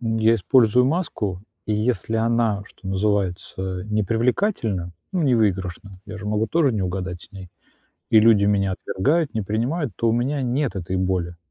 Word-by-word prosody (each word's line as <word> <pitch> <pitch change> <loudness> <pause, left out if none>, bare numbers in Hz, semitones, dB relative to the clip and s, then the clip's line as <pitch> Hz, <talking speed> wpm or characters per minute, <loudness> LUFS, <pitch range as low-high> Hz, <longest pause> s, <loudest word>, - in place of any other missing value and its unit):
я 115 -1 +2
использую 125 +2 +4
маску, 115 - -2 0.3
и 105 - 0
если 115 0 -1
она, 115 -2 +1
что 95 - -11
называется, 95 -1 -2
не 105 0 0
привлекательна, 115 - 0 0.2
ну, 180 -3 0
не 130 -4 +3
выигрышна, 95 -2 -2
я 110 +1 -7
же 105 - -7
могу 105 +1 0
тоже 155 -6 +2
не 105 -3 -1
угадать 90 -1 -4
с - - -16
ней, 95 -2 -10 0.6
и 110 - +7
люди 110 -2 +5
меня 100 -2 +2
отвергают, 140 - 0
не 110 - 0
принимают, 120 - -2
то 115 - +1
у - - +3
меня 130 +4 0
нет 125 -2 -1
этой 95 +1 -3
боли. 90 -2 -1
105 Hz, 170 wpm, -23 LUFS, 95-120 Hz, 0.6 s, и